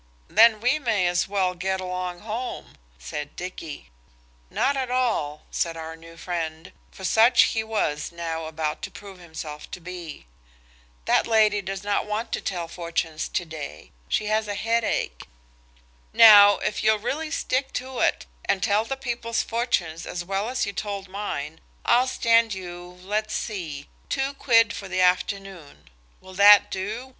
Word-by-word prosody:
"Then 225 -1 +6
we 250 +6 +2
may 225 -9 +1
as 175 0 +1
well 190 -2 0
get 190 +2 -2
along 180 -1 -4
home," 230 +4 -5 0.2
said 145 - -7
Dicky. 175 -4 -8 0.6
"Not 280 - +1
at 260 -2 -2
all," 230 -13 0
said 165 -1 -1
our 160 0 -6
new 165 0 -14
friend, 165 -2 -4 0.2
for 190 - -13
such 225 +6 +5
he 220 -1 0
was 175 -10 -2
now 165 -1 -4
about 155 -1 -3
to - - -5
prove 195 -2 -12
himself 160 -3 -8
to - - -7
be; 175 - -8 0.8
"that - - +3
lady 215 -2 +3
does 195 0 -5
not 205 +1 0
want 215 +2 -3
to - - -2
tell 175 -3 -3
fortunes 165 -2 -3
to 175 - -2
day. 150 - -8 0.2
She 215 - 0
has 215 +1 0
a 205 - -3
headache. 225 - -1 0.9
Now, 205 -2 +9
if - - -2
you'll 215 0 +4
really 285 +9 -3
stick 270 -3 -1
to 260 0 -4
it, - - +1 0.2
and 190 -2 0
tell 210 +3 +2
the 270 +3 -4
people's 235 -3 -2
fortunes 185 -9 -1
as 175 0 -5
well 195 +4 -2
as 255 0 -1
you 200 - -5
told 200 -1 -5
mine, 160 -6 -5 0.3
I'll 245 +2 +4
stand 230 -4 +3
you–let's 180 +4 -5
see–two 200 - -4
quid 230 -6 +3
for 195 - -7
the 185 0 -1
afternoon. 180 - -1 0.3
Will 185 0 -13
that 200 +2 +7
do? 215 +7 -4
195 Hz, 155 wpm, -25 LUFS, 170-225 Hz, 0.9 s, Now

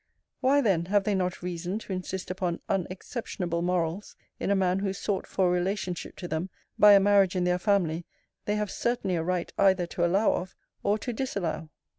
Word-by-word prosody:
Why, 280 +2 +4
then, 190 -9 +2
have 200 +2 +2
they 210 - 0
not 180 -2 -1
reason 180 +2 -3
to 215 -3 -6
insist 185 0 -4
upon 180 -2 -2
unexceptionable 185 -2 -3
morals 175 +2 -1 0.2
in - - -2
a 200 - +4
man 185 -1 +2
whose 195 -1 -2
sought 200 -2 -2
for 185 -2 +1
relationship 180 0 -2
to 175 - -6
them, 160 +3 -2 0.3
by 210 0 +9
a 200 - +8
marriage 195 -2 +4
in 180 - +1
their 180 0 +1
family, 175 -5 +1 0.4
they 210 - 0
have 210 -2 -2
certainly 235 -6 -1
a 165 - 0
right 175 +1 -2
either 190 -2 +4
to 175 +1 -3
allow 190 +5 +3
of, 185 +1 -4 0.3
or 205 +1 +2
to 240 +3 -4
disallow. 185 -10 -3
185 Hz, 190 wpm, -28 LUFS, 175-200 Hz, 0.4 s, by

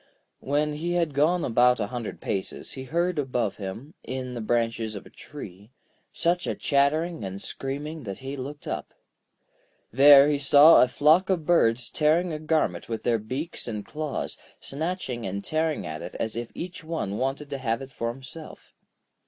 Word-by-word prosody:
When 150 +2 0
he 170 +4 -2
had 170 -4 0
gone 160 +5 +2
about 125 +1 +4
a 105 - 0
hundred 120 -3 -5
paces, 95 - -3
he 130 -1 -7
heard 170 +3 0
above 125 -7 -1
him, 110 - -7
in 130 -1 -5
the 120 - -4
branches 115 -1 0
of 100 - -8
a - - -15
tree, 105 -8 -11 0.4
such 175 +1 0
a - - -1
chattering 155 +1 +1
and 95 0 -5
screaming 145 +8 -5
that 100 -6 -6
he 135 +1 -6
looked 145 +2 -7
up. - - -5 1.0
There 140 +2 +8
he 145 -1 +1
saw 145 +3 +8
a 125 - +5
flock 155 +9 +4
of 175 -5 0
birds 120 -9 +2
tearing 160 +3 +2
a 155 - -4
garment 155 - 0
with 115 -1 -4
their 115 -2 +2
beaks 130 +11 -5
and 105 -3 -4
claws; 155 -2 -4 0.2
snatching 140 - -4
and 100 +1 -4
tearing 155 -1 0
at 80 0 -5
it - - -8
as 110 -1 -3
if 120 0 -4
each 175 -1 -6
one 155 -11 -3
wanted 135 +2 -2
to 140 - -3
have 115 -3 -1
it 135 - -11
for 115 -2 -3
himself. 135 +6 -11
140 Hz, 175 wpm, -26 LUFS, 115-155 Hz, 1.0 s, There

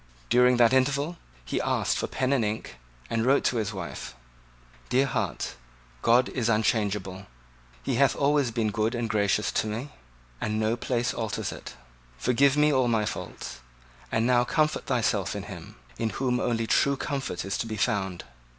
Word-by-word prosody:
During 125 0 +5
that 120 0 +5
interval 140 +5 +1 0.3
he - - -1
asked - - +1
for - - -1
pen 130 +1 0
and 130 -4 +2
ink, 105 - -4 0.3
and 115 0 0
wrote 135 +3 +3
to 125 - +1
his 105 -2 -1
wife: 95 - -6 0.7
"Dear 130 +2 +3
heart, 135 - -2 0.5
God 120 +2 +4
is 120 -3 -1
unchangeable: 105 -3 0 0.6
He - - -1
hath 135 -2 +4
always 140 -2 +2
been 110 -2 -1
good 110 +4 0
and 120 -1 -1
gracious 105 -1 +1
to - - 0
me: 115 +7 -4 0.5
and 105 0 -1
no 110 +1 +1
place 120 0 -1
alters 110 -3 -3
it. - - -9 0.4
Forgive 135 - +3
me 150 0 +4
all 130 -2 +3
my 110 -3 +2
faults; 75 - -6 0.5
and 110 +1 +1
now 120 0 +4
comfort 155 +4 0
thyself - - 0
in - - -4
Him, - - -9 0.2
in 115 - 0
whom 125 +3 0
only 115 -1 0
true 140 +4 +2
comfort 135 - -3
is 95 - -2
to 115 - -2
be 110 -1 -4
found. 95 -3 -1
115 Hz, 170 wpm, -27 LUFS, 110-130 Hz, 0.7 s, During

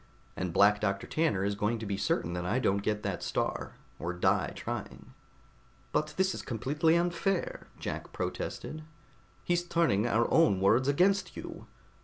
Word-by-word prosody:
And 90 -1 -2
Black 100 +3 +5
Doctor 100 -1 0
Tanner 130 -13 +1
is 100 - 0
going 105 +3 0
to 110 - -6
be 100 -1 -1
certain 85 -3 0
that 90 0 -3
I 90 +7 0
don't 100 -6 +1
get 105 0 -1
that - - -2
Star, - - -2 0.2
or 85 +2 -3
die 90 - +1
trying." - - -6 0.8
"But 155 0 -1
this 190 0 +2
is - - -5
completely 145 +7 +1
unfair," 175 - 0
Jack - - -5
protested. 155 - -4 0.6
"He's 175 0 +1
turning 165 - +2
our 115 0 +2
own 160 - +5
words 120 +7 +3
against 185 +5 +2
you! - - -8
120 Hz, 160 wpm, -30 LUFS, -, 0.8 s, Black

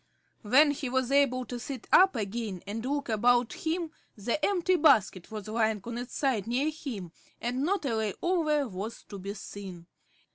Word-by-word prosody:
When 270 +7 +5
he 275 -2 -4
was 260 0 0
able 265 -3 +3
to 245 0 -6
sit 255 0 -6
up 380 +1 +6
again 210 -3 -3
and 215 +3 -4
look 285 +2 -2
about 240 +2 +3
him 330 0 -2 0.3
the 235 +9 -2
empty 370 -2 +2
basket 210 - +3
was 215 -2 -7
lying 220 -1 +1
on 235 +1 -5
its 245 - -7
side 250 -8 0
near 265 +6 +1
him, 235 - -6 0.3
and 245 +2 -2
not 360 +2 0
a 240 -4 0
lay 215 -3 -1
over 310 -6 +1
was 205 +2 -6
to 200 - -7
be 200 +2 -5
seen. 190 -4 -9
245 Hz, 180 wpm, -29 LUFS, 215-285 Hz, 0.3 s, up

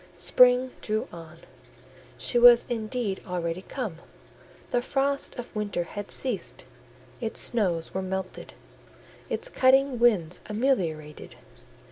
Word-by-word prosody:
Spring 250 +8 +4
drew 215 0 -2
on: 165 -1 -11 0.8
she 240 - +1
was 240 0 +8
indeed 225 -3 -3
already 175 -1 -3
come; 210 -5 -5 0.7
the 245 - +2
frosts 275 +2 -1
of 245 -1 -8
winter 205 -4 -2
had 205 +4 -7
ceased; 250 -7 -3 0.5
its 225 -2 -4
snows 180 -8 0
were 190 - -2
melted, 190 0 -5 0.8
its 470 - -3
cutting 265 - +3
winds 190 -8 +2
ameliorated. 180 - -2
215 Hz, 110 wpm, -26 LUFS, 180-250 Hz, 0.8 s, was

